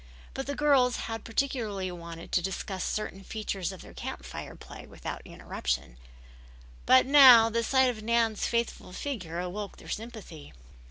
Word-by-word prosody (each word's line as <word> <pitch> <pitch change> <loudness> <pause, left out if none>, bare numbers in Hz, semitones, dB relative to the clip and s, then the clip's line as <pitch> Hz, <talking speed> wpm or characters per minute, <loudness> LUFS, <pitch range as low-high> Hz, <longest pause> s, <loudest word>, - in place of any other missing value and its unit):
Both 270 - -5
the 285 - -2
girls 270 -4 +3
had 225 0 -5
particularly 220 -6 -2
wanted 170 -1 -9
to 180 - +2
discuss 190 0 -4
certain 195 -2 -3
features 195 -4 -3
of 190 - -10
their - - -13
Camp - - -6
Fire - - -7
play - - -11
without - - -7
interruption, - - -4 0.9
but 260 0 +7
now 255 -5 +8
the 230 +1 +1
sight 260 +2 +3
of 220 -3 -9
Nan's 230 -1 +1
faithful 235 -5 -2
figure 180 - -4
awoke 190 +3 -5
their - - -13
sympathy. 215 -9 -7
220 Hz, 155 wpm, -29 LUFS, 185-250 Hz, 0.9 s, now